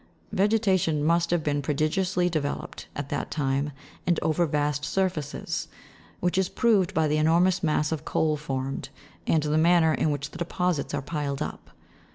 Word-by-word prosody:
Vegeta 205 -1 +3
tion 155 -3 0
must 170 +2 +2
have 175 -2 +1
been 145 -1 0
prodigiously 175 +6 +1
developed, 155 -5 -3
at 145 -1 -4
that - - -2
time, 140 0 0 0.4
and 175 -2 +3
over 165 +2 +2
vast 150 -1 0
surfaces; 185 -4 -2 0.5
which 180 +1 +1
is 190 - +1
proved 215 -7 +2
by 160 -1 +3
the 150 +1 +1
enormous 170 +4 +3
mass 150 -2 +1
of 155 -2 -2
coal 155 -1 +1
formed, 135 -2 -4 0.4
and 155 -2 +3
the 150 +1 +2
manner 165 -1 +5
in 155 - +1
which 145 0 -3
the 165 - -10
deposits 175 -3 -1
are 140 - -3
piled 145 -2 -3
up. - - -8
155 Hz, 170 wpm, -26 LUFS, 145-175 Hz, 0.5 s, manner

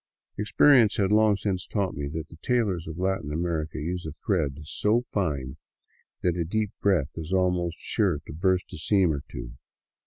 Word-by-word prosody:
Ex 105 - -3
perience 125 -8 +6
had 100 -1 +2
long 105 -1 +4
since 95 -3 -2
taught 100 -4 -1
me 70 0 -4
that 80 +1 -5
the 80 - -13
tailors 100 -5 0
of 80 0 -6
Latin 95 -5 -1
America 80 -1 -2
use 85 +3 -3
a 80 - -5
thread 80 - -1
so 105 +9 +1
fine 75 - -2 0.7
that 90 -2 +2
a 85 - 0
deep 105 +4 -1
breath 90 -9 +2
is 80 +1 -6
almost 90 -2 +1
sure 100 -8 +1
to - - -8
burst 95 +2 0
a - - -5
seam 90 0 +3
or 70 - -3
two. - - -7
90 Hz, 185 wpm, -26 LUFS, 80-100 Hz, 0.7 s, perience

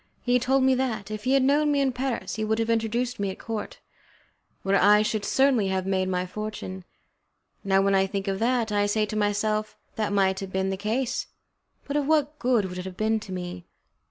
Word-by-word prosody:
He 250 0 +3
told 265 +2 +2
me 265 0 +4
that, 225 -6 -2
if 215 0 -6
he 260 - +2
had 275 -1 +4
known 295 +2 +3
me 285 - +2
in 275 -1 +2
Paris 255 0 -3
he 220 - -3
would 220 +1 0
have 225 0 0
introduced 230 +2 -1
me 200 -1 0
at 190 - -6
the - - -15
court, 225 -2 -5 0.9
where 195 0 +2
I 210 +1 +6
should 215 -1 -1
certainly 265 -6 +3
have 190 -1 -1
made 190 -1 0
my 180 0 -1
fortune. 190 -2 -6 0.8
Now, 195 -1 +3
when 195 0 +2
I 195 0 +3
think 195 0 -4
of 195 0 -1
that, 235 -1 +1
I 205 0 +2
say 215 +1 +1
to 210 - -6
myself, 215 +1 0 0.2
"That 215 -2 -1
might 195 -1 +2
have 195 -1 -6
been 190 0 0
the - - -1
case, 230 +6 -2 0.6
but 285 - -4
of 290 -2 +1
what 300 -1 +1
good 245 -5 +2
would 180 -1 -6
it 180 - -6
have 185 -1 -8
been 220 +1 +1
to 210 - -10
me?" 180 -1 -6
215 Hz, 225 wpm, -26 LUFS, 195-250 Hz, 0.9 s, I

